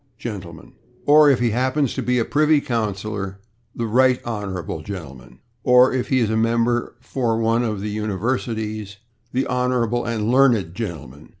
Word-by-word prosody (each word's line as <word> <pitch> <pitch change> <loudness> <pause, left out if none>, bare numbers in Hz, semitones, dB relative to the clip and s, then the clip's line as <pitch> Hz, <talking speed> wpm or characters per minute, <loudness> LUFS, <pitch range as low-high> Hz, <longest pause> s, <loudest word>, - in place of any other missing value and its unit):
gentleman/) 95 -9 -8 0.3
or, 150 0 +7
if 135 - +4
he 120 -2 +1
happens 130 +3 0
to - - -3
be 125 0 0
a 115 - +1
privy 150 +1 +3
councillor, 105 -5 -3 0.4
"the 115 - -3
/right 125 +3 +3
honorable/ 95 -8 -4
gentleman," 70 -10 -9 0.3
or, 125 +1 +5
if 130 -2 -1
he 130 - +1
is 115 -4 +1
a - - 0
member 115 +2 +1
for 120 -4 -1
one 115 +1 +2
of 105 -4 -2
the 105 +1 -3
universities, 110 -1 -3 0.3
"the 130 +2 0
/honorable 125 -2 0
and 115 -1 -1
learned/ 120 -10 +3
gentleman." 80 - -7
115 Hz, 160 wpm, -21 LUFS, 100-125 Hz, 0.4 s, or